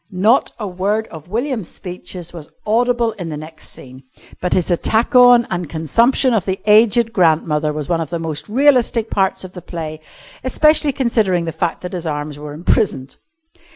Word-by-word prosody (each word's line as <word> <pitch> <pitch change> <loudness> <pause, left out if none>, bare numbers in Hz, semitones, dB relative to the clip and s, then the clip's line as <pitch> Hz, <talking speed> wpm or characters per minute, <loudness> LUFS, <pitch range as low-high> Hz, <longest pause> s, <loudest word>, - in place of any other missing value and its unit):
Not 215 +6 +2
a 215 - -5
word 200 +4 -1
of 160 -1 -11
William's 230 - -3
speeches 180 -1 -8
was 160 -4 -10 0.2
audible 235 +1 +1
in 170 - -4
the 150 - -5
next 155 +1 -10
scene, 130 0 -11 0.4
but 180 - -2
his 180 0 0
attack 220 - 0
on 245 -1 +7
and 175 -3 -3
consumption 230 - +2
of 215 -5 0
the 190 0 -2
aged 225 +2 +4
grandmother 155 -3 +2
was 150 -1 -5
one 170 -1 0
of 160 - -4
the 170 - -3
most 155 -1 -5
realistic 245 -3 +2
parts 190 -1 0
of 185 - -9
the 180 - -9
play, 160 -3 -6 0.4
especially 300 +3 +3
considering 220 -9 0
the 165 - -3
fact 170 +1 -3
that 180 0 -7
his 175 -2 -4
arms 150 -1 -4
were 150 0 -8
imprisoned. 155 - -1
185 Hz, 180 wpm, -18 LUFS, 160-230 Hz, 0.4 s, on